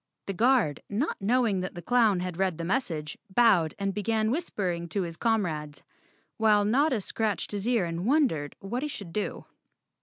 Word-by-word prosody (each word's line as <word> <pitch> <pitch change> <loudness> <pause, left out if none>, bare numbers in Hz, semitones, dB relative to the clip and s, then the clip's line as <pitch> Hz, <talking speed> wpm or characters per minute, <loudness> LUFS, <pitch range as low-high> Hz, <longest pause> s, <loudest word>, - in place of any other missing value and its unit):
The 195 - -3
Guard, 225 - +2
not 225 +7 -2
knowing 220 -1 +2
that 185 0 -4
the 175 - -6
clown 220 -4 +3
had 180 -1 -4
read 190 -4 +1
the 170 - -4
message, 165 - -2
bowed 190 -7 +4
and 195 -1 -1
began 220 +1 0
whispering 185 - -2
to 195 +3 -1
his 165 -1 -5
comrades, 165 -10 -1 0.5
while 210 -2 +4
Notta 255 +1 +2
scratched 215 +1 -2
his 205 +1 -3
ear 235 -7 +2
and 170 +4 -3
wondered 250 - +1
what 235 +6 -4
he 300 - -2
should 195 - -7
do. 210 - -3
205 Hz, 175 wpm, -28 LUFS, 175-235 Hz, 0.5 s, bowed